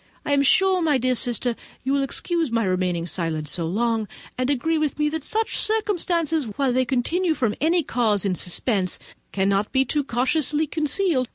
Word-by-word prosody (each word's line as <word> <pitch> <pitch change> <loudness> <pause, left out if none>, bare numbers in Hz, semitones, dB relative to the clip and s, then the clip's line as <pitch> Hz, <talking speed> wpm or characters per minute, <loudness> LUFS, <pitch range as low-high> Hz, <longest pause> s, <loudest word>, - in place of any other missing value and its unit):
I - - -2
am 280 - +4
sure, 375 +6 +4
my 305 -4 +3
dear 255 0 +1
sister, 245 -1 0 0.3
you 265 +1 0
will 280 - +2
excuse 330 +3 0
my 230 -1 +1
remaining 180 -3 0
silent 160 -2 -2
so 165 +2 -2
long, 225 +3 0 0.3
and 255 +1 -1
agree 315 +4 +1
with 305 -2 -1
me 300 0 +1
that 315 -1 -4
such 445 +5 0
circumstances, 350 -8 0
while 250 +4 -1
they 255 +1 +2
continue 320 +8 0
from 230 -7 0
any 330 +2 +2
cause 220 -7 +1
in 195 - +1
suspense, 185 +1 -1 0.3
cannot 200 +1 0
be 265 0 +2
too 295 +3 0
cautiously 290 +5 0
concealed. 300 - 0
260 Hz, 180 wpm, -23 LUFS, 215-315 Hz, 0.3 s, am